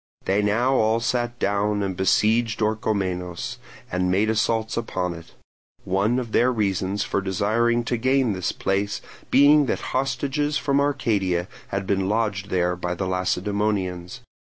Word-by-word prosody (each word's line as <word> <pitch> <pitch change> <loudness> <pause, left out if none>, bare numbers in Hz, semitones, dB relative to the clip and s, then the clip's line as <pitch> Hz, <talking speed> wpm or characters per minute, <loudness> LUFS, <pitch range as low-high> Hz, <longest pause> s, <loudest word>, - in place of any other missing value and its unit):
They 100 +2 +2
now 115 +6 +2
all 110 0 +2
sat 120 0 -1
down 100 0 0
and 95 -1 -2
besieged 110 +4 +2
Orchomenos, 105 -1 -2 0.3
and 90 0 0
made 100 +4 +2
assaults 110 0 0
upon 90 -6 -2
it; 85 -1 -13 0.5
one 100 +6 +1
of 120 -3 -3
their 125 +3 +3
reasons 100 -2 -1
for 100 - -1
desiring 110 +5 +1
to 120 +1 -1
gain 130 -1 +2
this 95 -1 -2
place 100 +1 -1 0.3
being 145 +1 +6
that - - -3
hostages 135 +3 0
from 140 -1 +1
Arcadia 100 -11 0 0.2
had 100 0 -3
been 95 0 0
lodged 105 -3 -1
there 90 -1 +1
by 90 0 -3
the 95 - -3
Lacedaemonians. 95 0 -1
105 Hz, 145 wpm, -24 LUFS, 95-120 Hz, 0.5 s, being